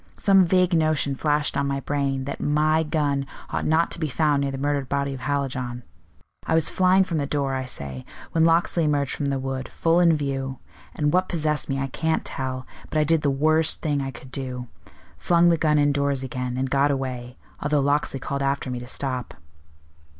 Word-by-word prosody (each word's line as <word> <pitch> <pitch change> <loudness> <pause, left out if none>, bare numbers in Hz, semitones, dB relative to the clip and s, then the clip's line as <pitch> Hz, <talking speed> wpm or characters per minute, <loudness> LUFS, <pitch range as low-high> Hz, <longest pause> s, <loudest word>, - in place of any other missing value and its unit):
"Some 195 -2 +5
vague 180 +1 +2
notion 155 -3 +2
flashed 150 +1 0
on 140 0 0
my 140 0 -1
brain 135 -1 -1
that 140 - -5
my 155 +2 +2
gun 145 -3 -1 0.2
ought - - -1
not 160 +2 +2
to - - -5
be 155 -2 -1
found 145 0 +1
near 140 - 0
the 135 - -4
murdered 140 -1 -1
body 140 0 -1
of 135 - -7
Hallijohn. 130 -3 -2 0.6
I 160 - +2
was 160 -2 +2
flying 185 +1 +4
from 170 -4 -2
the 140 - -1
door, 140 -2 -1
I 130 0 -2
say, 70 - -5 0.3
when 160 - +2
Locksley 165 +1 +3
emerged 145 -2 +1
from 145 - -3
the 140 -1 0
wood, 130 0 -4
full 165 +1 +2
in 170 -3 +4
view; 135 -2 -3 0.4
and 150 -1 0
what 185 +1 +2
possessed 155 -4 0
me 135 - 0
I 135 - -1
can't 160 +4 -1
tell, 130 -1 -4 0.2
but - - -2
I 155 - +4
did 160 +1 +2
the 145 - +1
worst 155 +3 +3
thing 145 -2 0
I 135 - -3
could 130 +1 -11
do 125 -2 -5 0.5
flung 175 0 +4
the 170 - +4
gun 155 -1 +2
indoors 140 -2 +1
again, 125 -1 -4
and 135 +1 0
got 140 +1 +3
away, 130 -3 -3 0.2
although 145 0 +1
Locksley 140 -1 +1
called 140 +1 -3
after 135 -1 -1
me 125 - -3
to 120 - -9
stop." 130 -2 -3
140 Hz, 205 wpm, -24 LUFS, 135-155 Hz, 0.6 s, Some